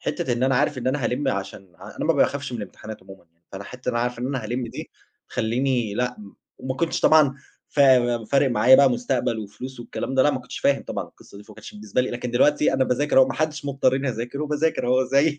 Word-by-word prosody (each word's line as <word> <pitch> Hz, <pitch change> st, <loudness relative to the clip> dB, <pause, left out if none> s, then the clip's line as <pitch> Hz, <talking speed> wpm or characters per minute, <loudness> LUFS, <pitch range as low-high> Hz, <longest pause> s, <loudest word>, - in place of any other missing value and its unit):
حتّة 170 Hz, -8 st, -2 dB
إن 120 Hz, +1 st, -2 dB
أنا 135 Hz, +1 st, +2 dB
عارف 145 Hz, 0 st, +1 dB
إن 125 Hz, -, -5 dB
أنا 130 Hz, 0 st, 0 dB
هألِم 135 Hz, +4 st, -1 dB
عشان 100 Hz, -4 st, -5 dB
ع -, -, -12 dB
أنا -, -, -3 dB
ما -, -, +3 dB
باخافش 140 Hz, -2 st, 0 dB
من 120 Hz, -, -4 dB
الامتحانات 105 Hz, +1 st, -9 dB
عمومًا 95 Hz, -1 st, -14 dB
يعني، 85 Hz, +1 st, -44 dB
فأنا 100 Hz, 0 st, -7 dB
حتى 125 Hz, +3 st, -5 dB
بابقى 120 Hz, -1 st, -1 dB
عارف 125 Hz, -1 st, -3 dB
إن 125 Hz, -, -3 dB
أنا 130 Hz, -4 st, -3 dB
هالم 120 Hz, +3 st, -3 dB
دي -, -, -8 dB, 0.4 s
تخلّيني 120 Hz, -1 st, -1 dB
لأ 125 Hz, +2 st, -2 dB
م 100 Hz, -2 st, -12 dB, 0.3 s
وما 130 Hz, 0 st, -4 dB
كنتش 165 Hz, +5 st, -1 dB
طبعًا 155 Hz, -4 st, +5 dB, 0.3 s
فا 125 Hz, -5 st, +3 dB
فارق 135 Hz, +3 st, +2 dB
معايا 125 Hz, +2 st, +5 dB
بقى 140 Hz, -1 st, +5 dB
مستقبل 120 Hz, -1 st, -1 dB
وفلوس 110 Hz, +5 st, -8 dB
والكلام 130 Hz, +2 st, -5 dB
ده، 130 Hz, -, +4 dB
لأ، 150 Hz, -, +4 dB
ما 130 Hz, -, -2 dB
كنتش 125 Hz, -, -9 dB
فاهم 140 Hz, -1 st, +1 dB
طبعًا -, -, -4 dB
القصة -, -, -17 dB
دي، 105 Hz, -, -13 dB
فما -, -, -15 dB
كانش 110 Hz, -, -11 dB
بالنسبة 105 Hz, +3 st, -2 dB
لي 125 Hz, -, -2 dB
لكن 120 Hz, 0 st, -4 dB
دلوقتي 145 Hz, +5 st, +3 dB
أنا 135 Hz, 0 st, +2 dB
باذاكر 135 Hz, +3 st, +1 dB
أهو، 130 Hz, -, +7 dB
ما 135 Hz, -, -3 dB
حدش 155 Hz, -2 st, -2 dB
مضّطرني 135 Hz, -1 st, 0 dB
أذاكره 120 Hz, +4 st, -4 dB
وباذاكر 150 Hz, -1 st, -1 dB
أهو 130 Hz, +1 st, +3 dB
زي 140 Hz, +3 st, +2 dB
125 Hz, 240 wpm, -23 LUFS, 120-140 Hz, 0.4 s, أهو